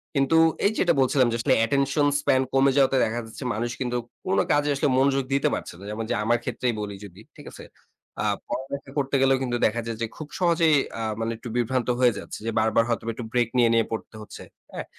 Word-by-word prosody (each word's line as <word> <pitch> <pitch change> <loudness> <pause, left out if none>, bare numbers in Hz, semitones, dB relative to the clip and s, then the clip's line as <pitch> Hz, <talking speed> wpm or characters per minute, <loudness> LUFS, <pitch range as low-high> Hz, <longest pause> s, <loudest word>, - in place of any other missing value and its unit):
কিন্তু 140 +4 +3 0.3
এই 205 - +4
যেটা 175 -2 +3
বলছিলাম 130 -1 +3
যে - - -1
আসলে 130 +2 +2
অ্যাটেনশন 140 +4 +2
স্প্যান 130 -2 +2
কমে 135 0 +4
যাওয়াতে 135 -1 +4
দেখা 115 +2 -2
যাচ্ছে 110 +4 -9
মানুষ 120 +3 -2
কিন্তু 125 -1 -1 0.3
কোন 185 - 0
কাজে 145 0 +2
আসলে 140 - +1
মনোযোগ 135 0 +2
দিতে 140 - +2
পারছে - - -6
না। - - -12
যেমন 110 +2 -4
যে - - 0
আমার 120 +2 +2
ক্ষেত্রেই 125 0 -2
বলি 100 -1 -5
যদি 95 +1 -14 0.2
ঠিক - - -13
আছে? - - -11 0.6
আ - - -1 0.2
পড়ালেখা 135 +1 -5
করতে 140 0 0
গেলেও 135 0 +4
কিন্তু 120 -1 -1
দেখা 115 +2 0
যায় 115 -1 -4
যে 115 - 0
খুব 155 - -7
সহজেই 165 -3 +3 0.2
আ - - -3 0.2
মানে 115 0 -1
একটু 120 - -9
বিভ্রান্ত 125 +1 0
হয়ে 125 -3 +4
যাচ্ছে - - -8
যে 115 - -1
বারবার 110 +1 +3
হয়তো 115 - -1
একটু 120 - -6
ব্রেক 120 -2 +2
নিয়ে 120 -2 +5
নিয়ে 115 0 +3
পড়তে 110 0 -6
হচ্ছে 105 - -10 0.3
হ্যাঁ। - - -5
125 Hz, 220 wpm, -25 LUFS, 115-140 Hz, 0.6 s, নিয়ে